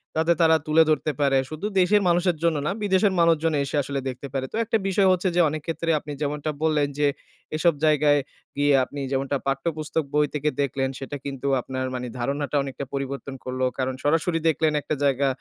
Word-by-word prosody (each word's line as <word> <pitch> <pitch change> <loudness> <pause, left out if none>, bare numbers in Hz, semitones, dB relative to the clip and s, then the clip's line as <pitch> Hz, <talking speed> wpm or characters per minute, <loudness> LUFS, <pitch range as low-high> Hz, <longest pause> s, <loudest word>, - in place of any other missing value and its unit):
যাতে 160 +2 +3
তারা 160 -1 +5
তুলে 155 +1 +5
ধরতে 155 0 +1
পারে। 135 -1 +3
শুধু 155 +6 -4
দেশের 205 +3 +4
মানুষের 175 -1 +2
জন্য 165 -2 +2
না, - - +1
বিদেশের 195 0 +3
মানুষজন 165 -1 +3
এসে 140 - -4
আসলে 140 +1 -3
দেখতে 130 +2 -7
পারে। 135 -1 -1
তো - - -6
একটা 225 +1 +1
বিষয় 195 0 +3
হচ্ছে 185 +1 +1
যে, 175 - +5
অনেক 155 +1 -4
ক্ষেত্রে 165 0 -2
আপনি 150 - -9
যেমনটা 150 +1 -2
বললেন 150 -2 +2
যে, 145 - +4 0.5
এসব 170 +2 +3
জায়গায় 150 -1 +4 0.4
গিয়ে, 145 0 +3
আপনি 140 +2 -8
যেমনটা 135 +1 0
পাঠ্যপুস্তক 155 +3 -1
বই 150 0 +4
তেকে 150 0 0
দেখলেন, 135 -1 -1
সেটা 140 +2 -5
কিন্তু 140 -1 -4
আপনার 130 +1 -4
মানি 125 0 -4
ধারণাটা 140 +4 -2
অনেকটা 135 0 -6
পরিবর্তন 140 0 -4
করলো। 130 0 -1
কারণ 130 0 -1
সরাসরি 165 +3 +1
দেখলেন 155 0 +1
একটা 155 - -2
জায়গা 140 0 +2
150 Hz, 190 wpm, -24 LUFS, 140-165 Hz, 0.5 s, তারা